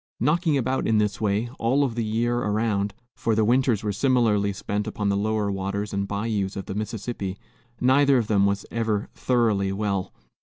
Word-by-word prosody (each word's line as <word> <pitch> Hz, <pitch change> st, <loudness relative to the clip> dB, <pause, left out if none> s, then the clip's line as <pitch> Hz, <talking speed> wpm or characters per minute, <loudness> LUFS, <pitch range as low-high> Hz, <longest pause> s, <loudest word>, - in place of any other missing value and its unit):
Knocking 155 Hz, +3 st, +2 dB
about 130 Hz, +1 st, 0 dB
in 110 Hz, -, +3 dB
this 105 Hz, 0 st, 0 dB
way, 105 Hz, +2 st, +1 dB
all 130 Hz, +5 st, +2 dB
of 130 Hz, -4 st, -1 dB
the 115 Hz, 0 st, -2 dB
year 120 Hz, +2 st, 0 dB
around, 105 Hz, -2 st, 0 dB, 0.2 s
for 115 Hz, -2 st, 0 dB
their 110 Hz, 0 st, +3 dB
winters 120 Hz, -2 st, +2 dB
were 105 Hz, -1 st, -1 dB
similarly 110 Hz, -4 st, +2 dB
spent 105 Hz, +1 st, -3 dB
upon 105 Hz, -1 st, -1 dB
the 100 Hz, -, +1 dB
lower 105 Hz, 0 st, 0 dB
waters 100 Hz, +2 st, -3 dB
and 100 Hz, 0 st, -1 dB
bayous 100 Hz, -1 st, -2 dB
of 100 Hz, -, -5 dB
the -, -, -5 dB
Mississippi, 105 Hz, -1 st, -4 dB, 0.4 s
neither 135 Hz, +2 st, +4 dB
of 120 Hz, -, +1 dB
them 100 Hz, -2 st, +3 dB
was 100 Hz, 0 st, -1 dB
ever 110 Hz, -3 st, -1 dB
thoroughly 110 Hz, -6 st, +1 dB
well. 100 Hz, -1 st, -2 dB
105 Hz, 185 wpm, -25 LUFS, 100-120 Hz, 0.4 s, neither